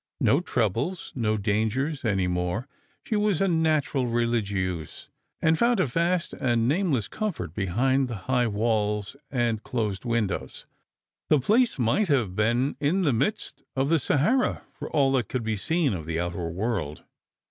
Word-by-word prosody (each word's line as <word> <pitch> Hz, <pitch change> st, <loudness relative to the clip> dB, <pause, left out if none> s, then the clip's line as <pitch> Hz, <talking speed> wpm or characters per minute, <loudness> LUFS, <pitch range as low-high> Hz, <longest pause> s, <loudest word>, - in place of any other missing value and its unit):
No 140 Hz, -, +4 dB
troubles, 125 Hz, -, -1 dB
no 110 Hz, -4 st, 0 dB
dangers, 110 Hz, +8 st, -1 dB
any 95 Hz, -5 st, +1 dB
more. 90 Hz, +6 st, -2 dB, 0.4 s
She 220 Hz, -, -2 dB
was 210 Hz, -5 st, +2 dB
a 195 Hz, -, +2 dB
natural 155 Hz, -6 st, +1 dB
religieuse, 100 Hz, -8 st, -2 dB, 0.3 s
and 160 Hz, 0 st, +3 dB
found 235 Hz, 0 st, +3 dB
a -, -, +3 dB
vast 170 Hz, +6 st, 0 dB
and 120 Hz, -2 st, +1 dB
nameless 145 Hz, -, +1 dB
comfort 210 Hz, -, -4 dB
behind 125 Hz, +8 st, +1 dB
the 120 Hz, -, -5 dB
high 125 Hz, -2 st, +2 dB
walls 105 Hz, 0 st, 0 dB
and 120 Hz, -4 st, 0 dB
closed 105 Hz, -7 st, -2 dB
windows. 115 Hz, -4 st, -2 dB, 0.6 s
The 150 Hz, -, +5 dB
place 225 Hz, -, +2 dB
might 130 Hz, -, +2 dB
have 120 Hz, -, +1 dB
been 120 Hz, +6 st, +1 dB
in 160 Hz, +7 st, +1 dB
the 145 Hz, -6 st, +3 dB
midst 140 Hz, -, -1 dB
of 135 Hz, +1 st, +1 dB
the 165 Hz, 0 st, +4 dB
Sahara, 155 Hz, -, +1 dB
for -, -, -7 dB
all 140 Hz, -3 st, +3 dB
that 130 Hz, -4 st, 0 dB
could 125 Hz, -3 st, -2 dB
be 110 Hz, 0 st, -1 dB
seen 155 Hz, -, 0 dB
of 80 Hz, -4 st, -5 dB
the 80 Hz, 0 st, -1 dB
outer 85 Hz, -1 st, -3 dB
world. 85 Hz, -5 st, -3 dB
120 Hz, 160 wpm, -26 LUFS, 105-150 Hz, 0.6 s, The